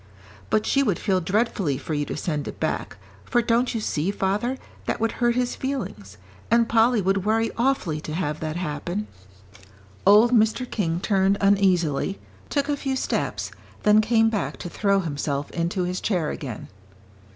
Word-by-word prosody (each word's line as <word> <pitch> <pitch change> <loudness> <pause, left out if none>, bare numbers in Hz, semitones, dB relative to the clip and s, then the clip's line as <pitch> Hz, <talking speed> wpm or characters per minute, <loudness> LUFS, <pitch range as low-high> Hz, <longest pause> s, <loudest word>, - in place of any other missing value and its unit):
"But 215 - +2
she 275 - +3
would 205 -11 +1
feel 190 -2 +1
dreadfully 195 - 0
for 150 +3 -5
you 145 -1 0
to - - -5
send 150 -5 -2
it - - -7
back, - - -2 0.3
for 240 - +1
don't 235 +1 +1
you - - 0
see, 170 -5 -1
father, 205 +6 -1 0.3
that - - -1
would 225 0 +1
hurt 240 -1 +1
his 250 0 0
feelings? 110 - -5 0.3
And 235 0 +4
Polly 230 -1 +3
would 195 0 +1
worry 225 +2 +1
awfully 230 - 0
to 155 - -6
have 155 -4 -2
that 155 0 -3
happen." 175 +4 -3 1.0
Old 210 +4 +6
Mr. 225 +2 +3
King 170 -7 -1
turned 195 -1 +2
uneasily, 195 -4 +2 0.3
took 285 -1 0
a 290 - +1
few 270 -1 -2
steps, - - -2 0.3
then 210 +1 +6
came 225 0 +3
back 210 - -2
to 175 - -6
throw 200 +2 +1
himself 145 -3 -3
into 175 +2 -1
his 180 +1 -2
chair 180 -8 0
again. 125 -7 -6
200 Hz, 170 wpm, -24 LUFS, 165-230 Hz, 1.0 s, Old